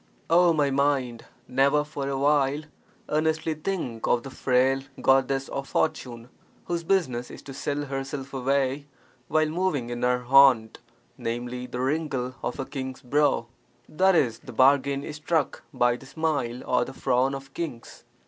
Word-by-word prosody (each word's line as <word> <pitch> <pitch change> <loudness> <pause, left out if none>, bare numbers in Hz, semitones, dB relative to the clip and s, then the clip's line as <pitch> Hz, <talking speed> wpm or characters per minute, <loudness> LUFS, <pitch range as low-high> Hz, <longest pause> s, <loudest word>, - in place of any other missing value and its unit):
O 175 +1 +6
my 145 -3 +2
mind, 135 -4 0 0.2
never 140 +3 +3
for 145 -2 -5
a 135 - -1
while 145 +1 +2 0.5
earnestly 160 +1 0
think 155 -8 -3
of 120 - +2
the 135 - -8
frail 130 +1 +2 0.2
goddess 135 0 +2
of 135 0 -4
fortune, 125 -7 -2 0.4
whose 170 -1 -2
business 145 -10 0
is - - -11
to 135 - -9
sell 145 +2 -2
herself 135 0 -5
away 135 +1 0 0.4
while 155 0 +2
moving 155 -7 -1
in 120 - -4
her 125 0 +1
haunt, 130 -3 +5 0.4
namely, 120 +2 -4
the 125 0 -6
wrinkle 135 -3 -1
of - - -4
a 135 - -2
king's 130 -2 -6
brow 140 -1 +2 0.5
(i.e., 180 -7 +4
the 130 - -9
bargain 140 +2 +3
is 150 - -6
struck 155 -1 -1
by 120 0 +2
the 135 - -14
smile 140 -5 -2
or - - +2
the 135 - -8
frown 130 +1 +1
of 135 0 -10
kings). 145 -9 -6
135 Hz, 155 wpm, -26 LUFS, 125-150 Hz, 0.5 s, O